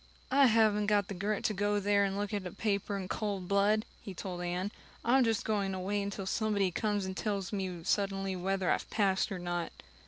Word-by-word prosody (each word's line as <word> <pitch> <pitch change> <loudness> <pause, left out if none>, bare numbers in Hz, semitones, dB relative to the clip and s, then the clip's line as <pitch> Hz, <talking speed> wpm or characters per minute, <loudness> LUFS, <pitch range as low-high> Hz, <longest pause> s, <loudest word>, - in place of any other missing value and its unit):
"I 275 0 +6
haven't 215 -2 +3
got 205 -1 +2
the - - -3
grit 200 +3 -2
to 215 - +1
go 205 +1 +1
there 200 0 +3
and 195 0 -1
look 205 +1 -2
at 200 -3 -2
a - - -7
paper 200 0 -1
in 190 -2 -4
cold 200 -3 -3
blood," 205 +2 +3 0.2
he 195 - -8
told 180 -1 -5
Anne. 180 +3 -2 0.3
"I'm 255 +3 +5
just 225 -3 +1
going 200 -3 0
to 190 - -3
wait 200 +2 -1
until 200 -1 -4
somebody 200 -2 +1
comes 205 +1 0
and 190 0 -4
tells 200 -2 -2
me 185 -4 -3
suddenly 195 0 0
whether 190 0 0
I've - - -1
passed 195 -3 +1
or 190 - -2
not." 175 -1 -3
200 Hz, 215 wpm, -32 LUFS, 190-210 Hz, 0.3 s, I